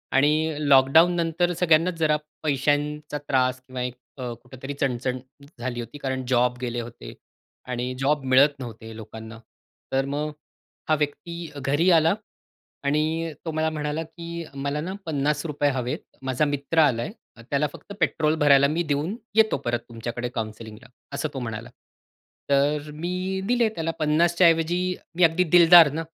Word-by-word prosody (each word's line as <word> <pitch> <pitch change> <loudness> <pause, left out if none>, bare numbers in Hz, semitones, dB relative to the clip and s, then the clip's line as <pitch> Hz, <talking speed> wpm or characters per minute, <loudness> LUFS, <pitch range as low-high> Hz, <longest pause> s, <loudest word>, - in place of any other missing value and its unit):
आणि 150 +3 +3
लॉकडाउननंतर 165 +5 +4
सगळ्यांनाच 170 +1 +4
जरा 155 -1 +3 0.3
पैशांचा 150 +1 0
त्रास 130 -1 +1
किंवा 130 -1 -7
एक 125 0 -3 0.2
अ, 125 -1 -4
कुठेतरी 130 +2 -8
चणचण 130 -2 -1 0.4
झाली 120 0 -3
होती. 120 +5 -7
कारण 130 -2 -3
जॉब 125 -1 +2
गेले 120 -1 -2
होते 110 - -10 0.6
आणि 125 +1 -2
जॉब 140 +1 +1
मिळत 135 +3 +5
नव्हते 115 -2 -8
लोकांना. 110 +1 -9 0.5
तर 135 0 +1
मग 150 +2 -2 0.6
हा 155 - +5
व्यक्ती 170 +3 -4
घरी 150 +6 +2
आला 165 +1 +5 0.7
आणि 155 +3 0
तो 160 - -2
मला 155 0 0
म्हणाला 150 +1 -3
की 170 +1 -7
"मला 140 +2 -2
ना 185 +4 -4
₹50 150 0 0
हवेत. 125 -1 -2 0.2
माझा 130 +3 0
मित्र 145 +3 -1
आलाय, 125 - +3 0.4
त्याला 145 +1 +1
फक्त 200 - -11
पेट्रोल 155 0 +1
भरायला 140 -1 +6
मी 165 +4 0
देऊन 155 +7 -1 0.2
येतो 220 -1 +4
परत 120 0 0
तुमच्याकडे 120 +1 -5
काउन्सिलिंगला." 110 -1 -6 0.3
असं 155 - -2
तो 135 - -4
म्हणाला. 115 -3 -5 0.8
तर 145 +2 +2
मी 180 +4 -3
दिले 240 -2 +3
त्याला. 165 0 -1
50च्या 170 +3 +4
ऐवजी 175 +3 +1 0.2
मी 180 - +3
अगदी 165 +2 +4
दिलदार 170 -3 +8
ना, 165 +2 -3
145 Hz, 145 wpm, -25 LUFS, 130-165 Hz, 0.8 s, दिलदार